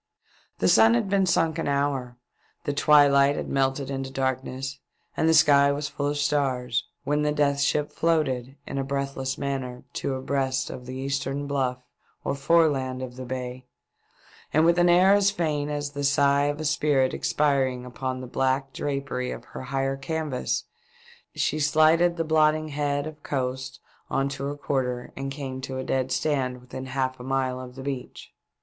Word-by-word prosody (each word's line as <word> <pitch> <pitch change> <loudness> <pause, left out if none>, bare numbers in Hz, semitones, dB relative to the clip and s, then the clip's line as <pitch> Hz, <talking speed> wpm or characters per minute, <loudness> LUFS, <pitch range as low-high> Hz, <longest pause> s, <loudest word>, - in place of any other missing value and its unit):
The 95 - +1
sun 110 +4 +6
had 120 +11 0
been 195 -2 +3
sunk 165 -2 +2
an - - -2
hour, 140 -3 -1 0.5
the 145 - -1
twi 145 0 +6
light 140 0 +4
had - - -4
melted 135 0 0
into 135 -1 -3
darkness, 130 0 -3 0.4
and 160 - +2
the - - +5
sky 140 -2 +6
was 145 +1 -2
full 145 - -2
of 145 0 -1
stars, 130 -4 0 0.2
when 150 +1 0
the 150 0 +1
Death 145 -1 +1
Ship 150 +1 +1
floated 140 -6 0
in 140 - -4
a - - 0
breathless 135 -1 -3
manner 130 -3 -4
to 135 - -2
abreast 130 0 -1
of 125 - -9
the 130 - -6
eastern 135 +1 -2
bluff 130 -3 -1 0.4
or - - -1
foreland 140 -4 +2
of 125 -1 -7
the 130 0 -7
bay, 125 0 -5 0.8
and 155 +2 +4
with 170 +1 +4
an 175 0 +5
air 185 +3 +6
as 200 -1 +4
faint 155 -7 -1
as 145 -1 -3
the 145 0 -4
sigh 140 0 +3
of 145 +1 -1
a 155 - -3
spirit 145 -3 +2
expiring 135 -4 +1
upon 130 +1 -4
the - - -6
black 135 +2 0
drapery 135 -3 -3
of - - -7
her - - -9
higher 135 +1 -1
canvas, 150 -2 -2 0.7
she 155 - 0
slided 155 +4 +4
the 165 - +1
blotting 155 0 +2
head 145 -1 -1
of 155 -1 -8
coast 130 -1 -3 0.3
on 135 - +1
to 140 0 -5
her 145 +1 -3
quarter, 125 -4 -2
and 135 0 -4
came 135 -2 -5
to 130 0 -5
a 130 - -3
dead 130 -1 -1
stand 130 -5 0
within 130 +1 -8
half 130 0 -2
a - - -8
mile 130 -1 -1
of 125 0 -10
the 135 - -8
beach. 135 -2 -6
140 Hz, 180 wpm, -26 LUFS, 130-145 Hz, 0.8 s, sun